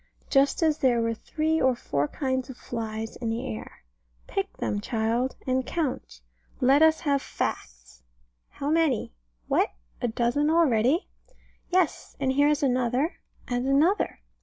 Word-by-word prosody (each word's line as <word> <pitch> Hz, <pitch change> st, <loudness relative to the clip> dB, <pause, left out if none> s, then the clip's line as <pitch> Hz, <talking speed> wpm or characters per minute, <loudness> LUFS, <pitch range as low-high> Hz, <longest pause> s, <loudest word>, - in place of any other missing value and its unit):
Just 275 Hz, +4 st, +3 dB
as 310 Hz, -2 st, +2 dB
there 245 Hz, -3 st, +3 dB
were 230 Hz, 0 st, +1 dB
three 315 Hz, +7 st, -1 dB
or 260 Hz, -1 st, +3 dB
four 145 Hz, -10 st, -1 dB
kinds 260 Hz, -, -2 dB
of 255 Hz, -, -8 dB
flies 225 Hz, -2 st, -5 dB
in 230 Hz, -, -3 dB
the 225 Hz, +1 st, -2 dB
air. 110 Hz, -, -7 dB, 0.4 s
Pick 195 Hz, -, -3 dB
them, 205 Hz, -, -2 dB
child, 230 Hz, +3 st, 0 dB
and 260 Hz, 0 st, +1 dB
count. 250 Hz, -, -3 dB, 0.4 s
Let 270 Hz, +4 st, +5 dB
us 320 Hz, 0 st, +5 dB
have 280 Hz, -3 st, +1 dB
facts. 60 Hz, -, -5 dB, 0.5 s
How 285 Hz, +1 st, -3 dB
many? 315 Hz, -, +1 dB, 0.3 s
What! -, -, +2 dB, 0.3 s
a -, -, +1 dB
dozen 240 Hz, +6 st, +1 dB
already? 305 Hz, -, +3 dB, 0.6 s
Yes 360 Hz, -4 st, 0 dB
and 270 Hz, -1 st, +1 dB
here 285 Hz, +2 st, +4 dB
is 295 Hz, -1 st, +1 dB
another, 255 Hz, +4 st, +1 dB, 0.3 s
and 245 Hz, +1 st, -1 dB
another. 305 Hz, +9 st, +2 dB
260 Hz, 145 wpm, -26 LUFS, 230-295 Hz, 0.6 s, Let